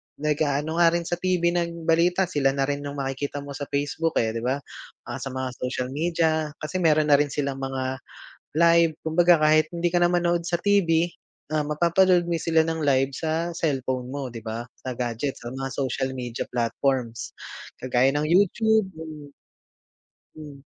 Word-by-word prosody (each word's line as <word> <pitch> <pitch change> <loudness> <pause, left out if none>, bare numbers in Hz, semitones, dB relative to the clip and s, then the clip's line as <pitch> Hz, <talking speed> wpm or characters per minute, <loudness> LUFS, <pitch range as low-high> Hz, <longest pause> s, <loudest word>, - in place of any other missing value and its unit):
nag-aano 150 0 0
nga 170 - +6
rin 170 0 0
sa 175 - 0
TV 175 -1 +1
ng 170 -1 -2
balita. 175 +3 +3
Sila 140 -5 +1
na 135 0 0
rin 145 0 -2
yung 145 0 -5
makikita 135 +1 -3
mo 140 0 -8
sa 145 - -5
Facebook, 145 +3 -1
eh, 110 0 0
'di 115 - -3
ba, 130 +3 0 0.5
ah, - - -5
sa 135 - -4
mga 130 0 -3
social 125 0 -3
media, 160 +1 0
kasi 175 +4 -3
meron 155 -2 +4
na 145 - +6
rin 145 0 +1
silang 140 -2 -3
mga 130 0 -2 0.6
live, 170 -1 +5
kumbaga 170 +1 +4
kahit 155 +1 +4
hindi 170 0 -1
ka 175 0 +2
na 175 - +3
manood 175 -1 +1
sa 170 0 -1
TV, 175 -4 +3 0.4
ah, 155 -1 +1
mapapanood 175 +4 +3
mo 165 - 0
sila 160 0 +3
ng 160 0 -2
live 135 -1 +2
sa 160 +4 -2
cellphone 130 -6 -2
mo, 135 -1 -5
'di 115 - -7
ba, 115 +1 -4 0.2
sa 130 -1 -5
gadgets, 120 +3 -3
sa 120 - -6
mga 135 0 -3
social 130 0 -1
media 120 -2 -4
platforms, 120 0 -1 0.4
kagaya 130 +1 +2
ng 150 +1 +1
YouTube 205 +4 +3
ganun. 155 -3 -9 1.1
Mm. 145 -3 -11
150 Hz, 175 wpm, -25 LUFS, 135-170 Hz, 1.1 s, nga